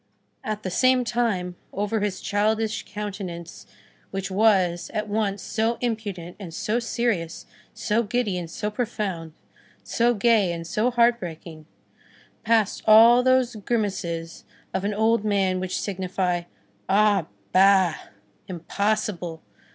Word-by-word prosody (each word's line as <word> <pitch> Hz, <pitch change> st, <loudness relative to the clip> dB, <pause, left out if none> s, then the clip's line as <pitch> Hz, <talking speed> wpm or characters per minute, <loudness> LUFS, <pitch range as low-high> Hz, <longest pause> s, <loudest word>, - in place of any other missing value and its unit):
At 215 Hz, -1 st, -4 dB
the 185 Hz, -, -3 dB
same 255 Hz, +5 st, +3 dB
time, 225 Hz, -7 st, -1 dB
over 205 Hz, +2 st, -1 dB
his 200 Hz, -2 st, -2 dB
childish 215 Hz, +1 st, 0 dB
countenance 190 Hz, -5 st, -7 dB, 0.4 s
which 195 Hz, 0 st, -4 dB
was, 190 Hz, -4 st, +2 dB
at 215 Hz, 0 st, -1 dB
once 205 Hz, -2 st, -1 dB
so 225 Hz, +1 st, -1 dB
impudent 205 Hz, -7 st, -4 dB
and 185 Hz, -5 st, -8 dB
so 220 Hz, +6 st, 0 dB
serious, 230 Hz, -8 st, -2 dB, 0.3 s
so 215 Hz, +3 st, +1 dB
giddy 220 Hz, -2 st, -1 dB
and 175 Hz, -2 st, -4 dB
so 210 Hz, +5 st, -3 dB
profound, 205 Hz, -8 st, -3 dB, 0.5 s
so 240 Hz, +1 st, +1 dB
gay 210 Hz, -3 st, +3 dB
and 165 Hz, 0 st, -6 dB
so 215 Hz, +8 st, 0 dB
heart 235 Hz, -1 st, +3 dB
breaking, 160 Hz, -3 st, -9 dB, 0.8 s
passed 220 Hz, -3 st, +2 dB
all 230 Hz, +3 st, +8 dB
those 255 Hz, -1 st, +2 dB
grimaces 190 Hz, -7 st, -3 dB, 0.3 s
of 190 Hz, -, -1 dB
an 205 Hz, 0 st, -1 dB
old 220 Hz, +1 st, +2 dB
man 195 Hz, -3 st, +1 dB
which 185 Hz, 0 st, -2 dB
signify: 185 Hz, -2 st, -2 dB, 0.4 s
Ah 200 Hz, -3 st, +3 dB, 0.3 s
bah! 190 Hz, -2 st, +5 dB, 0.5 s
impossible! 180 Hz, -1 st, -2 dB
205 Hz, 125 wpm, -24 LUFS, 180-225 Hz, 0.8 s, all